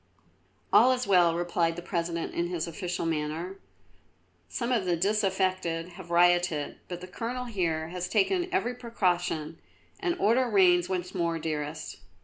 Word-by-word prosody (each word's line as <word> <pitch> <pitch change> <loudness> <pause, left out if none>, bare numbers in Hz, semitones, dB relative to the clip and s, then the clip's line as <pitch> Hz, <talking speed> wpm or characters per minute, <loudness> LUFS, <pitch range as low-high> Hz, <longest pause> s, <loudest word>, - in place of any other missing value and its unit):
"All 255 - +7
is 250 0 -2
well," 175 -4 +4
replied 170 -1 0
the 175 - -7
President 170 -2 -2
in 170 - -1
his 175 -2 -2
official 175 +1 -4
manner. 165 +4 -2 0.9
"Some 240 -1 -2
of 225 -6 +1
the 175 -1 +1
disaffected 185 -3 0
have 175 -1 -11
rioted, 175 -3 +2
but 175 -1 -6
the 185 - -8
Colonel 240 +6 -4
here 165 -8 -1
has 180 0 -4
taken 350 - +1
every 245 -7 0
precaution 175 -9 -1 0.4
and 365 -2 -1
order 245 - +3
reigns 180 -4 +4
once 180 -1 -3
more, 170 -2 0
dearest." 155 -1 -4
175 Hz, 145 wpm, -28 LUFS, 170-200 Hz, 0.9 s, All